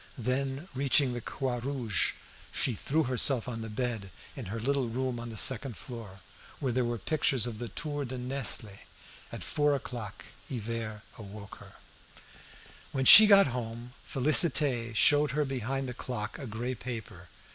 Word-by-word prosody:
Then, 135 +5 -3
reaching 135 -1 +3
the 120 - -5
"Croix 125 +1 -3
Rouge," 125 -5 -1 0.4
she 125 - -1
threw 150 +9 -1
herself 125 -1 +3
on 115 -2 -5
the 110 - -6
bed 110 -3 -3 0.3
in 130 - -7
her 110 +4 -5
little 135 +1 0
room 125 +1 -3
on 120 0 -7
the 110 - -8
second 125 0 +3
floor, 110 -7 -10 0.4
where 135 -4 -1
there 125 +1 0
were 120 0 -2
pictures 135 0 0
of 115 -3 -6
the 120 - -5
"Tour 145 +5 -4
de 130 +1 -6
Nesle." 125 -5 -3 0.5
At - - -7
four 145 -1 +1
o'clock 120 -7 -7 0.2
Hivert 115 -2 -5 0.2
awoke 100 -1 -10
her. - - -15 1.2
When 130 -1 -2
she 215 +10 +12
got 200 -1 +7
home, 120 0 -6
Félicité 135 -4 +2
showed 145 +6 +5
her 150 - +1
behind 135 0 -3
the 125 - -5
clock 120 +1 -6
a 135 - -7
grey 120 +4 -4
paper. 110 -8 -8
125 Hz, 160 wpm, -29 LUFS, 115-135 Hz, 1.2 s, she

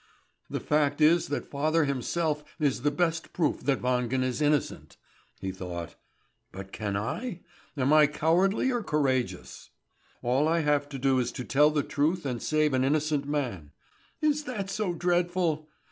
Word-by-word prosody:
"The - - -3
fact 145 -1 +1
is 160 +3 +4
that 145 - -4
father 155 +3 +2
himself 150 +3 -1 0.2
is 140 -5 +1
the 145 - +2
best 165 +2 -1
proof 165 -4 0
that 140 -3 +1
Wangen 125 0 +1
is 130 +3 -2
innocent," 150 -1 0 0.4
he 95 - -3
thought. 90 -2 -6 0.6
"But 95 +1 -9
can 100 -2 -3
I? 180 - -4 0.4
Am 135 +2 +2
I 155 -1 +7
cowardly 180 - +2
or 240 -2 -1
courageous? 135 - -1 0.5
All 130 +5 +2
I 165 +1 +2
have 145 -1 +1
to 140 - -6
do 135 0 +2
is 125 -1 -1
to 125 - -5
tell 150 +2 +4
the 150 -2 0
truth 160 +4 0
and 125 -3 -3
save 155 -2 +1
an 130 0 +2
innocent 150 0 +1
man. 120 - -3 0.5
Is 300 0 +1
that 200 -7 -4
so 195 -4 -1
dreadful? 175 -3 0
150 Hz, 160 wpm, -28 LUFS, 130-165 Hz, 0.6 s, I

